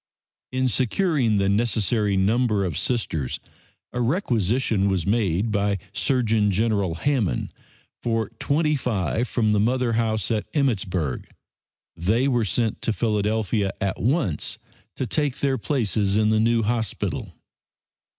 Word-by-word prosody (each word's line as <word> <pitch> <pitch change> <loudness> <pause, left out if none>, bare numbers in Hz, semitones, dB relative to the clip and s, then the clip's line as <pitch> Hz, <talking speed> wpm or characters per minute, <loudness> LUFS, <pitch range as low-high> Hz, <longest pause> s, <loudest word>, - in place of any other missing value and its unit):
In 130 0 +1
securing 130 - +1
the 100 -1 +2
necessary 105 -1 +1
number 105 +1 +2
of 85 -5 -3
Sisters 80 - -1 0.5
a 125 - -1
requisition 115 - +1
was 95 -4 0
made 100 -1 +1
by 100 -1 +1 0.2
Surgeon 115 -6 +2
General 100 -3 +1
Hammond 110 - -1 0.5
for 115 -3 -1
twenty 150 +1 +1
five 115 -2 -1
from 110 -3 +1
the 105 - +3
mother 120 +2 +1
house 110 -3 0
at 110 -2 -1
Emmittsburg. 95 - -1 0.7
They 110 +10 +1
were 120 -4 +2
sent 110 +2 -1
to - - 0
Philadelphia 105 -2 0
at 95 -2 -2
once 115 - 0 0.4
to 130 - -2
take 140 +2 -1
their 135 -2 0
places 105 - 0
in 110 0 +3
the 110 - +3
new 115 +1 +2
hospital. 110 0 -2
110 Hz, 130 wpm, -24 LUFS, 100-125 Hz, 0.7 s, the